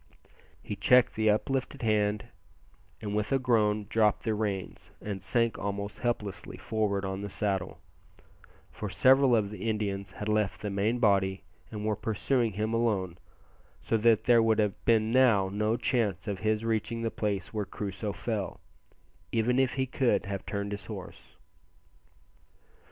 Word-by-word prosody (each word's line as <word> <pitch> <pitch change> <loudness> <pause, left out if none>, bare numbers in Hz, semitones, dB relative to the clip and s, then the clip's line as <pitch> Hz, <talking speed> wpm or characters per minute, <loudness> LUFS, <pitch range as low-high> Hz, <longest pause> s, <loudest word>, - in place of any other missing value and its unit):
He - - -4
checked 125 0 +4
the 110 0 +2
uplifted 130 +5 -1
hand, 105 -1 +1 0.8
and 105 -1 -3
with, 105 0 -1
a 135 - +4
groan 110 -5 +2
dropped 110 -2 +2
the 110 - 0
reins, 105 -3 -3
and 100 -2 -5
sank 115 +5 +1
almost 100 0 -4
helplessly 110 -5 -3
forward 100 -3 -1
on 95 0 -3
the 100 - -5
saddle; 95 -3 -2 0.9
for - - -5
several 130 -1 +5
of 105 -3 0
the 110 +1 -3
Indians 100 -3 -2
had 105 - -6
left 105 -2 0
the 105 - -3
main 105 +5 +1
body 100 -4 +2 0.3
and 105 -1 -5
were 110 -1 +1
pursuing 110 +2 0
him 110 +3 -2
alone, 100 -7 0 0.6
so - - 0
that 115 0 +4
there 120 -2 +5
would 115 -1 +3
have 105 -1 0
been 110 -1 +3
now 115 -7 +4
no 105 +3 0
chance 110 -8 -1
of 100 -2 -3
his 110 +1 0
reaching 115 +1 -1
the 115 - -1
place 100 -3 -3
where 105 -2 -2
Crusoe 105 +1 -4
fell, 100 0 -4 0.7
even 120 +3 +2
if 130 -1 +1
he 130 -1 +1
could 130 -1 +1
have 100 -1 -5
turned 100 0 -3
his 100 -2 -6
horse. - - -9
105 Hz, 155 wpm, -29 LUFS, 100-115 Hz, 0.9 s, several